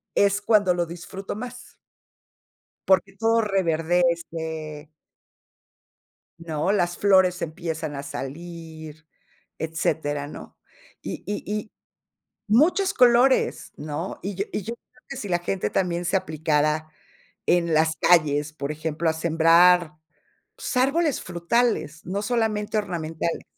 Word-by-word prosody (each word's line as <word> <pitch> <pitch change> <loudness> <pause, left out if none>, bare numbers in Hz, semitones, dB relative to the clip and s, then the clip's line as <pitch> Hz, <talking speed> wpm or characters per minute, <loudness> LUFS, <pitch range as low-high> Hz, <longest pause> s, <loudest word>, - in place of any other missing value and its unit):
es 200 0 +3
cuando 205 -4 +3
lo 175 -1 0
disfruto 175 +4 -7
más. 250 +3 -9 1.1
Porque 195 0 +3
todo 225 +1 +3
reverdece 165 -4 -1 1.5
¿no? 165 +1 -2
las 175 -4 0
flores 190 -3 +4
empiezan 160 -2 -4
a 140 - -5
salir, 160 +2 -8 0.5
etcétera, 155 -2 -1
¿no? - - -11 0.4
Y - - -6
y 205 - -3
y 210 0 -3 0.8
muchos 350 - +3
colores, 250 +2 +3
¿no? 150 +4 -5
Y 200 +1 -4
yo 200 +2 -2
y - - -1
yo 230 - -4
creo 250 +1 -29
que 275 - -6
si 220 - -5
la 175 -1 +1
gente 185 +2 -2
también 175 -2 -1
se 180 - 0
aplicara 155 -2 0 0.6
en 170 -1 +2
las 160 +1 +3
calles, 150 -3 +3
por 145 -1 -4
ejemplo, 160 +1 -2
a 160 - +3
sembrar, 165 +1 +4 0.6
pues - - -5
árboles 280 +4 +2
frutales, 175 -2 -1
no 190 +4 -2
solamente 215 -2 0
ornamentales. 165 -4 -3
175 Hz, 120 wpm, -24 LUFS, 160-205 Hz, 1.5 s, flores